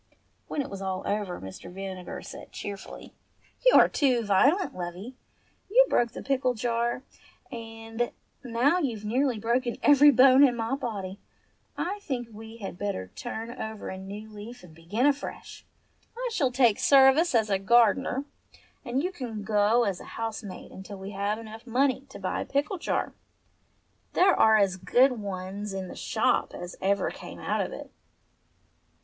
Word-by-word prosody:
When 285 - -2
it - - -8
was 195 -1 -6
all 190 -1 -3
over 205 -3 -2
Mr. 95 - -9
Vinegar 190 -1 -7
said - - -10
cheerfully, 200 -1 -8 0.5
"You - - +6
are - - +8
too 255 -5 +2
violent, 275 - +3
lovey. 185 +7 -6 0.5
You - - +6
broke 235 -1 +2
the - - -7
pickle 260 -2 +1
jar, 235 +2 -1 0.5
and 225 0 -4 0.3
now 250 +8 +2
you've 230 - -3
nearly 250 +2 +1
broken 240 +3 0
every 290 0 +7
bone 265 +1 +7
in 255 -4 +5
my 230 +1 -2
body. 205 -7 -4 0.6
I 400 +4 -2
think 245 - -4
we 220 +1 -10
had 195 -5 -7
better 95 - -3
turn 220 - -6
over 220 -1 -5
a 190 - -6
new 200 +3 -8
leaf 215 +3 -10
and 170 -3 -14
begin 170 - -1
afresh. 285 0 -2 0.5
I - - -2
shall 275 -11 +1
take 245 -4 +3
service 275 +3 +5
as 220 -2 +2
a 195 - +2
gardener, 240 +5 +3 0.6
and 260 +2 -1
you 365 - -1
can 230 - -6
go 215 +3 +3
as 195 -5 -1
a - - -11
housemaid 220 -4 -5
until 195 +1 -9
we 190 +1 -7
have 200 +1 -1
enough 225 +1 -10
money 260 +2 +1
to - - -10
buy - - -2
a - - -1
new - - -17
pickle 295 +7 -1
jar. - - -1 1.0
There 370 +1 +5
are 220 0 +6
as 195 -3 +2
good 245 +9 +4
ones 195 +1 -5
in 190 -1 -4
the - - -8
shop - - 0
as 175 +1 -7
ever 200 +1 +1
came - - -10
out - - -1
of - - -3
it." - - -9
225 Hz, 165 wpm, -27 LUFS, 200-260 Hz, 1.0 s, are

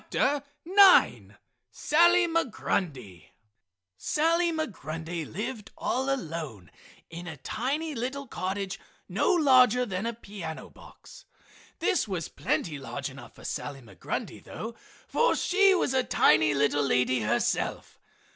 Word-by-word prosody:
SALLY 345 +3 +4
MIGRUNDY 175 - -3 0.6
Sally 335 - +1
Migrundy 165 - -4
lived 210 +3 -5
all 265 +2 -1
alone 160 - -5 0.4
in 170 +1 -8
a 160 -3 -7
tiny 285 - -3
little 265 +3 -4
cottage 195 -3 -4 0.3
no - - +1
larger 255 - +5
than 195 0 -3
a 235 - -2
piano 195 -8 -8
box. - - -15 0.5
This 360 - +1
was 180 -5 -4
plenty 150 -4 -2
large 135 - -5
enough - - -13
for - - -15
Sally 140 -2 -5
Migrundy 115 - -6
though, 225 +2 -7 0.3
for 480 +1 +2
she 390 +1 +4
was 310 - 0
a 260 -1 +2
tiny 155 - +3
little 145 +1 +2
lady 130 -2 +2
herself. 105 - -1
210 Hz, 115 wpm, -27 LUFS, -, 0.6 s, larger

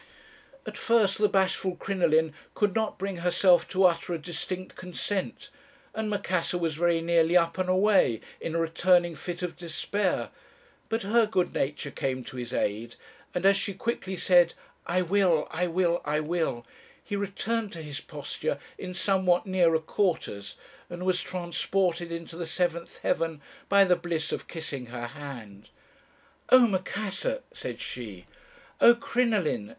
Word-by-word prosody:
At - - -7
first 220 -5 +3
the 210 -1 +4
bashful 190 -1 +1
Crinoline 160 -5 +1 0.2
could 205 -2 +1
not 220 -1 -1
bring 195 -1 -3
herself 180 +1 +4
to 190 0 +2
utter 175 -1 +3
a - - -2
distinct 180 +3 -5
consent, 200 +8 -4 0.4
and 220 -1 -2
Macassar 185 -4 0
was 165 -2 -1
very 170 +1 +2
nearly 170 +1 +4
up 170 +1 +1
and 185 0 0
away, 185 - +4 0.2
in 165 - -4
a - - +2
returning 175 +1 +3
fit 175 +4 -6
of 180 - -3
despair. 180 +3 -2 0.6
But 225 +1 -1
her 220 +2 +3
good 185 -4 0
nature 145 +1 -2
came 130 -1 -2
to 130 - -9
his 120 -1 -5
aid; 115 0 -2 0.4
and 180 +1 -1
as 195 0 +7
she 200 -1 -3
quickly 195 -3 -3
said, 175 -2 +4 0.3
'I 180 +1 +2
will, 180 -3 +2
I 180 +2 0
will, 175 0 +1
I 150 +1 0
will,' 155 -7 -1 0.4
he 205 - -4
returned 205 +2 -2
to 165 -2 -7
his 145 -1 -5
posture - - -4 0.2
in 180 -1 -6
somewhat 185 0 +2
nearer 180 -4 +3
quarters, 160 - -2 0.3
and 175 +1 -6
was 185 -1 +2
transported 175 -1 -1
into 165 0 -6
the 170 -1 -4
seventh 170 0 -2
heaven 165 -2 0 0.3
by 200 0 +7
the 180 -2 +4
bliss 165 -3 -3
of - - -4
kissing 145 -6 -6
her 120 0 -5
hand. 120 -6 -9 0.8
"'Oh, 255 -1 +8
Macassar!' 215 - -2
said - - -5
she. 105 -7 -7 0.5
"'Oh, 240 - +8
Crinoline!' 220 - 0
175 Hz, 155 wpm, -28 LUFS, 160-195 Hz, 0.8 s, Oh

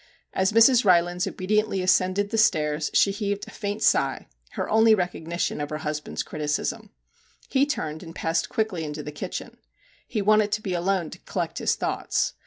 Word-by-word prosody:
As 190 +1 +1
Mrs. 230 +3 +6
Rylands 175 0 +3
obediently 195 +1 0
ascended 185 +2 +2
the 225 - -1
stairs 150 -6 +2
she 200 - +4
heaved 205 0 -3
a - - -10
faint 205 +2 -4
sigh - - +2 0.3
her - - -3
only 220 0 +5
recog 180 -4 -3
nition 170 -3 -2
of 145 - -3
her 150 - -3
husband's 150 -1 -4
criticism. 155 +8 -3 0.6
He 275 +1 +2
turned 160 - -3
and 165 -2 -10
passed 165 +1 -1
quickly 215 -7 -1
into 150 0 -5
the 150 - -6
kitchen. 145 - -6 0.5
He 215 -4 -2
wanted 215 0 +4
to 215 - 0
be 190 - -2
alone 175 -1 0
to - - -10
collect - - -4
his - - +1
thoughts. - - -1
185 Hz, 180 wpm, -25 LUFS, 160-215 Hz, 0.6 s, Mrs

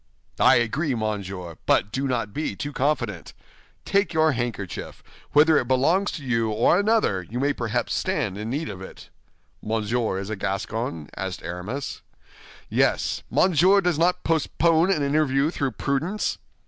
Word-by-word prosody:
"I - - +6
agree, 130 +5 0
monsieur; 95 -6 -4
but 100 - +3
do 135 +4 -1
not 115 -5 -2
be 150 -9 -3
too 145 +8 -5
confident. 120 - -1 0.5
Take 195 -3 +1
your 160 0 +4
handkerchief; 115 - -4 0.3
whether 150 +1 +6
it 125 - -3
belongs 160 +11 +2
to 150 -6 -7
you 115 -3 +1
or 115 - +3
another, 210 - +2
you 110 +8 -6
may 140 +2 +1
perhaps 115 -5 -2
stand 95 - -1
in 105 +2 -5
need 150 +6 -2
of 95 - -7
it." 95 - -11 0.5
"Monsieur 110 -1 -1
is 100 +2 -5
a - - -1
Gascon?" 100 -3 -3
asked 95 -2 -5
Aramis. 90 - -5 0.7
"Yes. - - +1
Monsieur 185 +2 +4
does 180 -5 0
not 180 +2 +2
postpone 165 +2 +2
an 155 -6 +1
interview 140 0 +2
through 140 -7 -2
prudence?" 155 - -1
130 Hz, 150 wpm, -24 LUFS, 105-155 Hz, 0.7 s, I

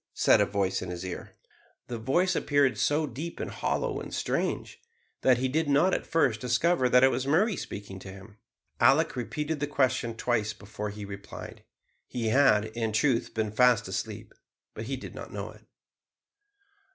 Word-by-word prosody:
said - - +5
a - - +3
voice 100 -2 0
in 95 - -5
his 90 +1 -5
ear. 90 - -7 0.5
The 120 -2 -5
voice 175 +11 +1
appeared 145 -4 +2
so 150 +2 +2
deep 150 +6 -6
and - - -4
hollow - - -1
and - - -8
strange, - - -2 0.4
that 130 -2 +4
he 130 +2 0
did 155 +3 0
not 150 +7 +4
at - - -2
first 130 -9 +2
discover 125 +3 +2
that 125 +1 +5
it 135 - +6
was 130 +2 -2
Murray 190 +9 +3
speaking 100 -7 -7
to 95 - -9
him. 100 +2 -13 0.4
Alick 135 +6 +4
repeated 150 +5 -3
the 145 - -1
question 130 -5 0
twice 110 -4 0
before 105 0 -6
he 105 0 -7
replied. 100 0 -9 0.4
He 115 -3 -2
had, 110 -4 +4
in 115 -2 -1
truth, 120 +1 +1
been 110 -2 -1
fast 125 0 +4
asleep, - - -5 0.4
but 110 - -6
he 135 +3 -3
did - - -9
not - - -9
know - - -5
it. - - -19
125 Hz, 175 wpm, -28 LUFS, 105-145 Hz, 0.5 s, it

